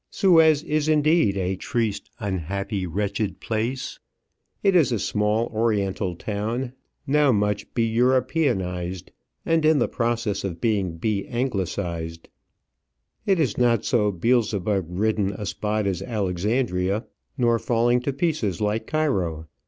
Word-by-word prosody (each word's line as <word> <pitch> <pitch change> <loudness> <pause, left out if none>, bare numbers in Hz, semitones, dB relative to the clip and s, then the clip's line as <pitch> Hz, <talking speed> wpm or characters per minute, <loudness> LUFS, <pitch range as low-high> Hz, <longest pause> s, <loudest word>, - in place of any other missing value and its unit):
Suez 160 -5 +4
is 155 -1 0
indeed 155 - +3
a 95 0 -1
triste, 110 +1 -2
unhappy, 100 0 -3
wretched 100 +2 -2
place. 115 +4 -3 0.6
It 195 -2 +4
is 155 -7 +4
a 115 - +1
small 105 +3 +1
oriental 100 -4 0
town, 110 +7 -3 0.3
now 145 0 +4
much 105 -2 0
be 115 - +2
Europeanized, 115 - 0 0.3
and 165 -1 +2
in 155 0 +5
the 125 - +2
process 115 -3 -1
of 90 -4 -4
being 95 -6 0
be 100 +2 -1
Anglicized. 90 -9 -3 1.0
It 195 -3 +3
is 130 -10 0
not 120 -3 +3
so 105 -6 +2
Beelzebub 105 -2 +1
ridden 100 +2 0
a 105 +2 -6
spot 105 +1 -1
as 95 -2 -1
Alexandria, 100 0 -1 0.3
nor 120 -2 +3
falling 120 +1 +2
to 130 +3 -2
pieces 135 - -1
like 105 +1 -1
Cairo. 95 - 0
110 Hz, 130 wpm, -24 LUFS, 95-125 Hz, 1.0 s, in